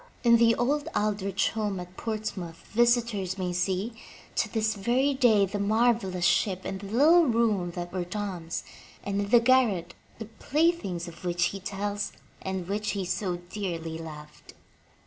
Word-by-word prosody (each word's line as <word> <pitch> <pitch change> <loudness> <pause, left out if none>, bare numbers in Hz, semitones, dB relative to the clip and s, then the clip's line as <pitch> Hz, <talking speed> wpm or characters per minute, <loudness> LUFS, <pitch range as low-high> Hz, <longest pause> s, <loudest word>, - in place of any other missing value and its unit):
In 235 -1 +6
the 230 0 +5
old 285 +4 0
Aldrich 200 -2 0
home 210 -4 -2
at 180 +1 -9
Ports 215 0 -3
mouth 170 -4 -8
visitors 235 -5 +2
may 180 -2 -2
see, 190 +5 -1 0.4
to 220 - 0
this 220 -1 +1
very 245 +7 +1
day, 230 -7 +4
the 205 +2 -4
marvelous 210 -4 +2
ship 180 +1 +2
and 195 - -4
the 200 - -8
little 305 - +5
room 220 -6 +2
that 175 0 -5
were 185 -1 -1
Tom*s, 180 -3 -4 0.4
and 200 0 -1
in 200 - -3
the 240 - +7
garret, 235 -7 +3 0.2
the 220 - -6
playthings 225 - 0
of 170 +1 -11
which 175 0 0
he 195 - -5
tells 205 +2 -3 0.3
and 190 -2 -4
which 210 +2 -1
he 195 -2 -2
so 185 0 -2
dearly 165 -5 -4
loved. 150 -2 -11
200 Hz, 165 wpm, -27 LUFS, 180-230 Hz, 0.4 s, the